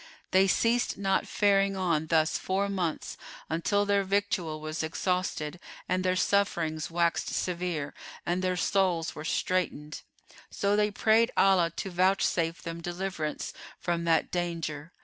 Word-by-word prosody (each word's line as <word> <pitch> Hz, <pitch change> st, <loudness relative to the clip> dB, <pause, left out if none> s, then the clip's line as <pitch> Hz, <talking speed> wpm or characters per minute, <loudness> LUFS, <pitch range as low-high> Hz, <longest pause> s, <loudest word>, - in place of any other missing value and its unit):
They 190 Hz, +1 st, +5 dB
ceased 235 Hz, +5 st, +2 dB
not 195 Hz, -1 st, +1 dB
faring 195 Hz, -1 st, +2 dB
on 165 Hz, -4 st, 0 dB
thus 160 Hz, -1 st, +2 dB
four 195 Hz, +2 st, 0 dB
months 180 Hz, -5 st, -2 dB, 0.3 s
until 200 Hz, +5 st, +1 dB
their 200 Hz, -1 st, +2 dB
victual 195 Hz, -5 st, -1 dB
was 155 Hz, +1 st, -4 dB
exhausted 170 Hz, -1 st, -2 dB, 0.3 s
and 185 Hz, 0 st, 0 dB
their 185 Hz, 0 st, +2 dB
sufferings 170 Hz, -5 st, +1 dB
waxed 170 Hz, 0 st, +1 dB
severe 175 Hz, -5 st, -2 dB, 0.3 s
and 175 Hz, +1 st, 0 dB
their 185 Hz, -1 st, 0 dB
souls 180 Hz, -4 st, +1 dB
were 155 Hz, -, -7 dB
straitened; 155 Hz, -2 st, -1 dB, 0.5 s
so 200 Hz, +1 st, 0 dB
they 210 Hz, 0 st, +3 dB
prayed 220 Hz, +2 st, +3 dB
Allah 190 Hz, -3 st, +5 dB
to 195 Hz, -, -4 dB
vouchsafe 180 Hz, -2 st, +1 dB
them 165 Hz, -1 st, -5 dB
deliverance 175 Hz, -3 st, -4 dB, 0.3 s
from 170 Hz, -1 st, -1 dB
that 165 Hz, -1 st, +2 dB
danger. 170 Hz, -3 st, -3 dB
180 Hz, 135 wpm, -29 LUFS, 165-195 Hz, 0.5 s, They